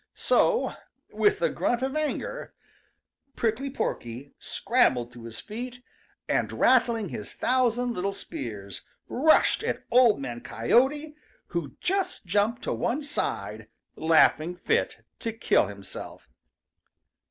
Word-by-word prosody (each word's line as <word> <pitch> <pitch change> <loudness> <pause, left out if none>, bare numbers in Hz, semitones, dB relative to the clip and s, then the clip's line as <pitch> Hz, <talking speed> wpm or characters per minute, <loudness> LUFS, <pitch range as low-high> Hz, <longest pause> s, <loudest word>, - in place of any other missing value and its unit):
So, 480 0 +2 0.4
with 415 +2 +2
a - - +4
grunt 245 +1 0
of 270 +1 -2
anger, 310 +10 -3 0.8
Prickly 235 +5 0
Porky 130 - -4
scrambled 130 - +1
to 120 -1 -11
his 115 -1 -8
feet, 245 +3 -7 0.4
and - - 0
rattling 235 -5 +3
his 105 - -7
thousand 245 -1 +1
little 195 -1 -1
spears, 110 - -7 0.3
rushed 310 +5 +4
at - - -2
Old 245 - +6
Man 120 -3 -5
Coyote, 265 - +1 0.4
who 170 -5 -4
just 385 - -1
jumped 205 +6 +1
to - - -1
one 290 +5 -1
side, 290 - -3 0.3
laughing 160 +1 +4
fit 450 - -1
to 230 - -2
kill 225 - +2
himself. 100 -1 -9
230 Hz, 120 wpm, -27 LUFS, -, 0.8 s, Old